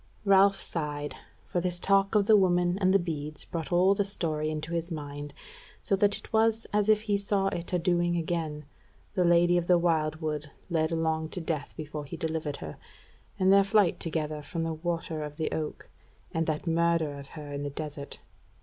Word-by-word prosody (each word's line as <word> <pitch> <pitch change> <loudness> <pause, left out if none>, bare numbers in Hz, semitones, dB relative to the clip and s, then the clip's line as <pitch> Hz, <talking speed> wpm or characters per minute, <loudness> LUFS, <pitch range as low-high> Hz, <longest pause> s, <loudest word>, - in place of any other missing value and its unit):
Ralph 195 0 +5
sighed, 145 -3 -4 0.3
for 175 - -1
this 175 0 -2
talk 195 +2 +2
of 205 -1 +4
the 215 - +6
woman 180 -1 +3
and 185 -1 +3
the 195 - +6
beads 155 -4 -5
brought 165 0 -5
all 180 +3 +5
the 205 - +1
story 155 -6 -1
into 155 +2 -4
his 170 +1 -2
mind, 145 -2 -6 0.5
so 200 - +2
that 205 +1 +3
it - - -9
was 225 0 +3
as 210 0 +2
if 215 -1 +5
he 205 -2 0
saw 200 -1 +1
it 170 -2 -4
adoing 175 -1 +1
again: 160 -3 -2 0.5
the 185 - +2
Lady 175 0 +4
of 170 - -5
the 180 - +6
Wildwood 155 -3 0 0.2
led 160 -1 +1
along 160 -1 0
to 180 - -4
death 160 -4 -3
before 150 -1 -5
he - - -7
delivered 160 -2 -2
her, 75 - -8 0.6
and 190 +1 +4
their 200 0 +7
flight 200 -3 +3
together 155 -2 -3
from 165 +3 -4
the 165 0 -1
Water 165 -1 -3
of 150 0 -7
the 160 - -1
Oak, 155 -1 -4 0.4
and 165 0 -1
that 155 +1 -1
murder 165 -2 +2
of 140 -1 -9
her 145 -1 -7
in 140 - -3
the 145 - -3
desert. 145 0 -7
165 Hz, 195 wpm, -29 LUFS, 155-185 Hz, 0.6 s, their